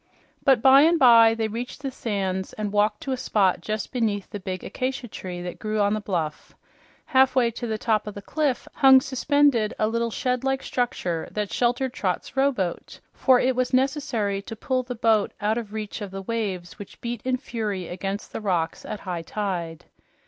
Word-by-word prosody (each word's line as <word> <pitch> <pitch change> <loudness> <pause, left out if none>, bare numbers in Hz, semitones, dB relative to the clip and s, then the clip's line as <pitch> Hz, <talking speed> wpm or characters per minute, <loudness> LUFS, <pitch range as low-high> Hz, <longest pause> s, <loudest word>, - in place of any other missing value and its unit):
But 265 -4 +4
by 270 +1 +8
and 330 +3 +5
by 230 -4 +7
they 225 -1 -1
reached 240 +6 -6
the 270 - -2
sands 190 -6 -3
and 210 -1 -4
walked 210 0 +2
to 270 - -4
a 260 - 0
spot 195 -7 +1
just 215 +3 -4
beneath 215 -5 -1
the 205 - -5
big 185 -1 -5
acacia 260 0 -3
tree 180 -4 -7
that 180 - -6
grew 215 0 -2
on 205 0 +3
the 215 - -2
bluff. 165 -7 -4 0.5
Halfway 260 -2 +3
to 240 +1 -5
the 220 -1 -2
top 215 -1 0
of 210 - -6
the 200 - -7
cliff 295 -1 -1
hung 265 -1 +7
suspended 275 -3 +2
a 215 - +2
little 230 +1 0
shed 250 +2 -1
like 270 0 0
structure 180 -9 -2
that 210 -1 -3
sheltered 245 +1 +1
Trot's 195 -2 -3
rowboat, 265 -10 -1
for 260 -2 +4
it 260 0 +1
was 255 +1 +1
necessary 255 -7 0
to 225 - -8
pull 255 +3 -1
the 250 0 -6
boat 225 -2 +2
out 215 +3 +1
of 220 -3 -8
reach 215 0 -5
of 205 - -4
the 195 +1 -7
waves 195 -5 -4
which 205 - -10
beat 235 -2 -4
in 255 0 0
fury 210 - -4
against 195 +3 -5
the - - -4
rocks 175 -6 -1
at 210 - -6
high 180 -3 -4
tide. 170 -3 -4
220 Hz, 195 wpm, -25 LUFS, 200-255 Hz, 0.5 s, by